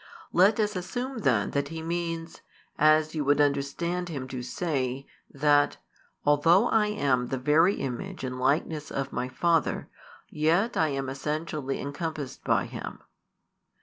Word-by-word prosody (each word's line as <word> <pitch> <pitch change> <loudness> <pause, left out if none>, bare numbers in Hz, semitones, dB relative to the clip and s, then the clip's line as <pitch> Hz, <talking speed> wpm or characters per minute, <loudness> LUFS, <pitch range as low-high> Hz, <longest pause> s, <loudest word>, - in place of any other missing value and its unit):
Let 200 +5 +5
us 210 -1 +1
assume 245 +8 -4
then 110 - +1
that 140 0 0
He 160 +1 -6
means, 165 -1 -4 0.3
as 155 +1 +4
you 155 -2 -1
would 145 +1 +3
understand 150 +5 0
Him 135 -5 -5
to 130 -1 -5
say, 130 -1 -2 0.2
that 145 0 +3 0.5
"although 165 +9 +4
I 215 -2 +3
am 135 -12 +1
the 135 - -2
Very 155 +9 +4
Image 155 +9 -5
and 125 0 -4
Likeness 150 +3 0
of 135 0 -3
My 125 - -2
Father, 165 +3 +1 0.4
yet 170 +9 +1
I 160 - +3
am 135 -2 -2
essentially 150 +1 -3
encompassed 145 -1 -5
by - - +2
Him." - - -8
150 Hz, 145 wpm, -27 LUFS, 135-170 Hz, 0.5 s, Let